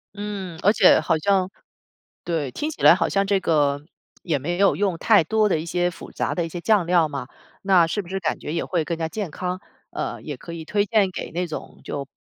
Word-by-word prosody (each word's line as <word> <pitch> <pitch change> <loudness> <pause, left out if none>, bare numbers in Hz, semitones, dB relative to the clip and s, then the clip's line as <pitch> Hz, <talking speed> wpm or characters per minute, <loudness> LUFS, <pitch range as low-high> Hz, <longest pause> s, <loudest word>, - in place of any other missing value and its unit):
嗯， 200 -4 -5
而 205 +3 +5
且 190 -5 +6
好 160 +1 +1
像 190 +2 +2 0.8
对， 160 -6 -2
听 305 - -3
起 310 - -9
来 - - +9
好 185 - 0
像 195 0 +1
这 195 0 +2
个 145 -4 +1 0.4
也 160 -5 0
没 175 +6 -3
有 200 0 +4
用 195 -3 0
太 205 -1 +4
多 215 +4 +2
的 165 - +1
一 160 - -6
些 175 +1 0
复 170 - -12
杂 - - -2
的 170 -2 -1
一 - - -6
些 175 +1 -6
酱 205 -3 +2
料 170 -3 +3
嘛， 140 -2 -5 0.4
那 185 -4 +5
是 190 +5 -2
不 180 - -9
是 195 +1 -3
感 160 -3 -1
觉 150 - -6
也 165 - -1
会 170 -4 -1
更 170 +1 -3
加 160 -1 -2
健 190 +1 -4
康， 180 +4 -4 0.3
呃， - - -4
也 - - -6
可 170 - -10
以 165 -1 -7
推 205 +5 0
荐 200 -2 +2
给 - - -6
那 175 +2 -1
种 155 - -8
就 140 -1 -5
175 Hz, 255 characters per minute, -23 LUFS, 160-195 Hz, 0.8 s, 来